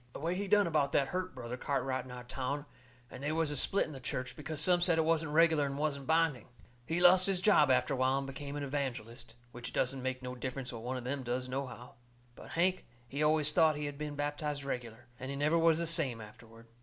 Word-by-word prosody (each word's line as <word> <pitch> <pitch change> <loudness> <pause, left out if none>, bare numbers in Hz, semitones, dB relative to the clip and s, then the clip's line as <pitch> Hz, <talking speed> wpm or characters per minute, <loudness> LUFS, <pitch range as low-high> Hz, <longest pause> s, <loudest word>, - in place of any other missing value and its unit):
The - - -7
way 165 +4 -1
he 200 +2 -3
done 205 +1 +4
about 150 -4 +1
that 135 -1 +2
hurt 185 -2 -3
Brother 125 0 -6
Cartwright 130 -1 -1
in - - -12
our 125 0 -8
town, 135 +3 -3 0.5
and 130 - -9
they 145 +2 -1
was 160 -1 0
a - - -2
split 195 +8 +3
in - - -9
the 135 - -8
church, 125 0 -4
because 150 0 -5
some 180 -1 +4
said 175 -2 +3
it 160 - +2
wasn't 160 -2 +1
reg'lar 160 -1 +4
and 140 0 -3
wasn't 140 -2 -2
binding. 160 -7 +2 0.4
He 165 +2 0
lost 180 +1 +6
his 195 -2 +2
job 180 -7 +5
after 130 +2 +3
a - - -1
while 130 +1 +2
and 135 - -2
become 140 +1 -6
an 145 - -3
evangelist. 130 -4 -4 0.2
Which 120 0 -7
it - - -12
don't 130 +1 0
make 130 0 -3
no 125 0 -4
difference 125 0 -5
what 115 - -7
one 125 +2 -3
of 125 - -6
them 135 +2 -3
does, 125 +1 -3
nohow. 130 -2 -5 0.4
But - - -11
Hank, 185 +2 +1 0.2
he 140 +5 -4
always 150 -1 +3
thought 160 -2 +4
he 150 0 -3
had 145 0 -6
been 150 -1 -4
baptized 145 0 -3
reg'lar. 125 -4 -5
And 130 - -6
he 140 - -3
never 150 +3 +2
was 165 -1 +4
the 170 - -1
same 160 -8 0
afterward. 115 +1 -13
140 Hz, 245 wpm, -32 LUFS, 130-160 Hz, 0.5 s, lost